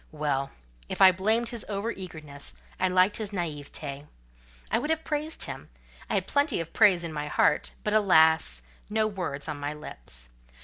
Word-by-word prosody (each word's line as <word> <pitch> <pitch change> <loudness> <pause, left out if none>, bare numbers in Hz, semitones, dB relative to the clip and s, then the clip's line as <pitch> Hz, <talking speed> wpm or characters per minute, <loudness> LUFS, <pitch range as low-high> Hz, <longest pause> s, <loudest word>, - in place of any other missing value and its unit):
Well! 145 -3 -1 0.4
if - - -4
I 190 -1 +9
blamed 220 +6 +1
his 235 -2 -4
over 205 +3 -1
eagerness, 155 -8 -7 0.2
I 185 - +3
liked 185 +2 +3
his 215 -2 -3
naiveté. 150 -5 -5 0.6
I - - +3
would 300 - -3
have 320 0 0
praised 305 +1 -2
him: - - -6 0.4
I - - 0
had - - +1
plenty 285 - +1
of 165 -1 -5
praise 185 -4 +5
in 165 -2 -4
my 150 -1 -3
heart; 150 - +2
but, 210 - 0
alas! 160 - +4 0.3
no 220 +1 +2
words 180 -9 -4
on 150 -2 -4
my 145 +1 -3
lips. - - -5
175 Hz, 175 wpm, -28 LUFS, 150-215 Hz, 0.6 s, I